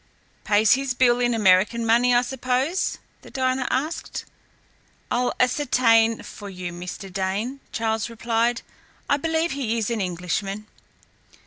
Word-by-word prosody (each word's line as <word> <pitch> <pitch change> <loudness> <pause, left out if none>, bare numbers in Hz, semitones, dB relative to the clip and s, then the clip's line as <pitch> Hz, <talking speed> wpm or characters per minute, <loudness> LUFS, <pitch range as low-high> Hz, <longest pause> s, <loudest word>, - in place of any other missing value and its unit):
"Pays 210 0 +3
his 265 -1 -1
bill 245 -1 +4
in 240 -1 +1
American 210 +3 +3
money, 240 +2 +4
I 240 0 +4
suppose?" 260 +7 -1 0.2
the - - -14
diner 260 -1 -1
asked. 300 +6 -3 0.9
"I'll 245 +1 +1
ascertain 230 -4 +3
for 205 -1 -9
you, 180 -2 -6
Mr. 180 +2 -8
Dane," 200 +8 -2
Charles 220 0 -1
replied. 230 +1 0 0.4
"I 285 - +3
believe 325 +3 0
he 245 -5 -2
is 225 0 -1
an 225 -3 -1
Englishman." 190 +3 -3
235 Hz, 130 wpm, -23 LUFS, 210-255 Hz, 0.9 s, bill